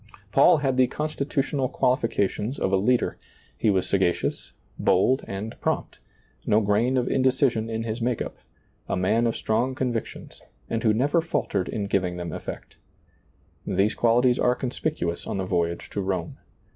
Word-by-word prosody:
Paul - - +6
had 135 -3 0
the 130 -1 +5
constitutional 140 -2 -1
qualifications 125 -2 0
of 95 - -1
a - - +6
leader; 120 +6 +1 0.4
he 110 - +1
was 95 -2 +1
sagacious, 95 -3 0 0.3
bold, 130 +9 +3
and 100 +3 -5
prompt, - - -2 0.4
no 105 - +3
grain 110 +5 +2
of 125 - +1
indecision 130 -4 +2
in 115 0 -2
his 115 +1 -4
make 120 0 0
up; - - -5 0.5
a - - 0
man 110 +6 +2
of 115 - -1
strong 120 +4 0
convic 125 -4 -1
tions, - - -12 0.3
and 115 - 0
who 110 - +3
never 140 +10 +2
faltered 100 - -1
in 105 -2 -2
giving 90 -3 0
them 85 -2 -5
effect. - - -7 0.9
These 100 +2 +1
qualities 120 +1 +3
are 125 0 +3
conspicuous 125 - -3
on - - -2
the 95 - -2
voyage 85 -2 -1
to 100 - -2
Rome. 95 -1 -3
115 Hz, 160 wpm, -25 LUFS, 100-130 Hz, 0.9 s, Paul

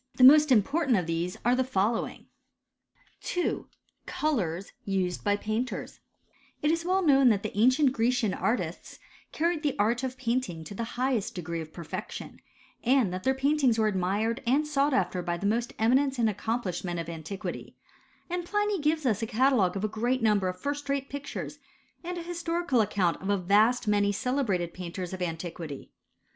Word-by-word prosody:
The 255 - +6 0.2
~ - - -9
important 260 - +3
of 180 - -1
these 165 +2 -2
are 245 +1 +4
the 260 - +2
following: 225 -2 -1 1.1
w 355 - -1
I, - - -40
COLOURS 195 - -1
USED 190 -4 -1
BY 205 0 +2
PAINTERS, 220 +5 -3 0.6
s 330 +2 +2
well 375 +2 +1
known 270 -3 +6
that 205 -3 +1
the 215 - -5
ancient 255 +6 +4
Grecian 235 -4 +1
artists 230 +3 -2 0.3
carried 330 0 0
the 295 -4 -1
art 230 +4 +2
of 255 0 -3
painting 230 -10 -2
lo 200 - -8
the 230 - -3
highest 250 -4 0
degree 170 -2 -4
of 155 0 -9
perfection, 170 -2 -7 0.4
and 245 -6 +3
that 185 - -4
their 265 0 +2
paintings 270 -3 +2
were 220 - +2
admired 210 +4 0
and 280 +5 +3
sought 285 -2 +1
after 180 -1 0
by 175 0 -2
the 195 - -5
most 230 +3 0
eminent 260 +4 +2
and 235 -2 +3
accomplished 210 -2 -2
men 175 -2 -3
of 165 -1 -4
antiquity; 170 +4 -6 0.5
and 355 0 -2
Pliny 415 +2 0
gives 305 0 +1
us 220 -4 +1
a 225 - -1
catalogue 225 -6 +2
of 195 - -4
a - - +2
great 235 +4 -1
number 210 -4 +3
of 185 0 -4
lirst 285 0 -3
rate 275 0 -1
pictures, 285 0 -6 0.4
and 355 +1 -4
a 345 - -5
historical 340 -6 0
account 195 -5 0
of 190 - -4
a 200 - +3
vast 210 +6 +3
many 205 -1 +3
celebrated 205 -7 -1
painters 180 0 -6
of 185 - -6
anti 170 0 -3
quity. 155 -5 -8
225 Hz, 180 wpm, -28 LUFS, 190-270 Hz, 1.1 s, The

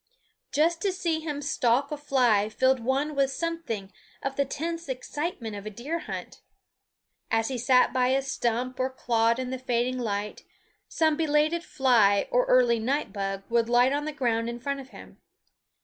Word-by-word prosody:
Just 330 +3 +2
to 395 - +1
see 340 -3 -1
him 295 -2 -4
stalk 255 0 +1
a - - -1
fly 245 -8 +2
filled 260 +4 +2
one 270 +5 0
with 275 -1 +2
something 270 - -4 0.3
of 275 0 -2
the 280 - +1
tense 330 +3 -4
excitement 260 -3 -4
of 205 +1 -7
a - - -2
deer 270 +11 -4
hunt. - - -7 0.9
As 225 +1 +1
he 260 - -3
sat 250 +1 +4
by 250 -1 +2
a 270 +1 +2
stump 255 -1 -2
or 255 +1 +1
clod 230 -3 +1
in 255 0 -4
the 260 - -4
fading 250 0 -1
light, 210 -3 -3 0.4
some 315 -2 +2
belated 310 +1 +1
fly 240 - +3
or - - +3
early 245 - +4
night 270 +7 -1
bug 195 -1 -3
would 235 0 +1
light 245 +2 +4
on 290 +1 -1
the 310 - -2
ground 235 -5 0
in 240 0 -5
front 280 +3 -3
of 265 -1 -10
him. - - -14
260 Hz, 180 wpm, -27 LUFS, 235-295 Hz, 0.9 s, sat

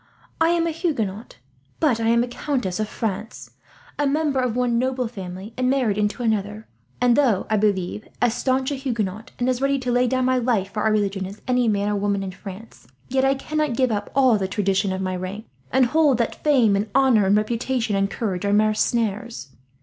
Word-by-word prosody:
I 325 - +5
am 340 -1 +2
a 335 - 0
Huguenot, 240 - -3 0.4
but 275 -8 +2
I 225 - 0
am 235 +1 +4
a - - -3
countess 240 -7 -2
of 215 -1 -2
France, 215 +1 -5 0.5
a 290 - +2
member 290 -1 +1
of 250 -3 0
one 245 -2 +1
noble 255 -1 -1
family 195 -1 -8
and 255 0 0
married 255 -6 +1
into 210 +3 -1
another; 215 -1 -1 0.3
and 245 -1 +4
though, 240 -9 +2
I 215 - +3
believe, 205 0 -1
as 245 -2 +2
staunch 260 +2 0
a - - -1
Huguenot, 225 -5 -3
and 245 - -1
as 255 0 0
ready 275 0 +2
to 250 -2 -2
lay 245 +1 +3
down 255 +1 +1
my 255 0 +2
life 225 -6 0
for 210 - -2
our 220 - +2
religion 200 -3 0
as 200 +2 -11
any 250 -1 +2
man 205 -1 +1
or 210 - 0
woman 200 -1 0
in 190 - -4
France, 195 - -11 0.2
yet 265 +1 +1
I 270 0 +3
cannot 305 -1 -2
give 255 -2 +2
up 205 -1 -2
all 255 -6 +4
the 190 - -1
traditions 195 0 0
of 190 - -4
my 185 -1 -2
rank, 185 +4 -6 0.3
and 260 0 +4
hold 295 0 +3
that 235 -2 -2
fame 250 -9 +4
and 205 +2 -1
honour 255 -7 +4
and 200 +2 +4
reputation 230 0 -1
and 195 0 +1
courage 195 -4 -3
are 200 0 +1
mere 215 +1 +3
snares. 220 - -1
225 Hz, 215 wpm, -23 LUFS, 205-255 Hz, 0.5 s, I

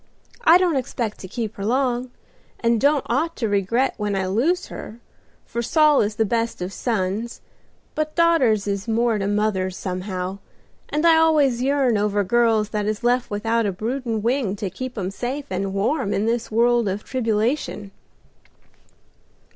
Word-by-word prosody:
I 335 -4 +8
don't 355 -5 +1
expect 235 -4 -3
to 190 - -8
keep 220 +1 -5
her 195 - -5
long, 250 +2 0 0.5
and 230 -1 +1
don't 285 0 +3
ought 305 +9 0
to 230 - -1
regret 205 +6 +1
when 210 -2 -2
I 190 -1 0
lose 255 - +1
her, 225 - -9 0.5
for 235 - -3
Saul 300 +4 +4
is 210 0 -1
the 220 - +1
best 230 +2 -1
of 180 +2 -4
sons; 220 0 -2 0.5
but 310 0 -2
daughters 275 -12 +3
is 200 0 -3
more 230 -1 +1
to 195 - -1
mothers 205 -3 0
somehow, 185 0 -4 0.5
and 305 +3 0
I 330 -1 +6
always 295 -7 +3
yearn 265 -4 +2
over 205 0 +1
girls 225 0 +2
that 210 -1 -2
is 215 +2 -2
left 245 +1 +1
without 225 +2 0
a - - 0
broodin' 225 +2 -3
wing 235 -4 0
to 195 -2 -4
keep 255 +5 -6
'em 190 -2 -2
safe 260 +7 -4
and 190 +1 -2
warm 205 +3 0
in 205 - 0
this 230 +1 -1
world 235 0 +3
of 195 +3 -4
tribulation." 225 -3 -1
230 Hz, 165 wpm, -22 LUFS, 205-255 Hz, 0.5 s, I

